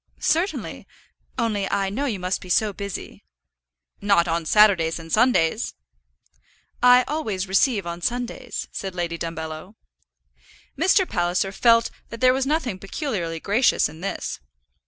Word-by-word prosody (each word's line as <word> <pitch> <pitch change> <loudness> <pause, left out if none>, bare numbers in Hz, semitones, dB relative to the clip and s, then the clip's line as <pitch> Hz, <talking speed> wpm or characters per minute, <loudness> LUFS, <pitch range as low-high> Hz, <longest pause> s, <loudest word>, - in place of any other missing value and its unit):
"Certainly, 345 +5 -1 0.5
only 210 -4 -1
I 195 -1 0
know 270 +8 -2
you 230 -8 -1
must 185 0 -2
be 185 - -11
so 210 +3 +2
busy." 200 -1 -7 0.8
"Not 200 -4 +3
on 165 -1 -1
Saturdays 190 -6 +4
and 165 -1 -10
Sundays." 215 -9 +2 1.1
"I 250 +1 +7
always 215 -11 -2
receive 195 +1 +2
on 170 0 -5
Sundays," 245 +4 -3
said 190 -2 -5
Lady 170 -2 -3
Dumbello. 160 +3 -6 1.0
Mr. 380 0 +3
Palliser 180 0 0
felt 230 +2 +3 0.2
that 230 - -8
there 255 0 +5
was 265 +1 -1
nothing 275 - -1
peculiarly 195 - -3
gracious 220 +9 +2
in 160 - -12
this. 195 - -4
200 Hz, 135 wpm, -23 LUFS, 175-245 Hz, 1.1 s, I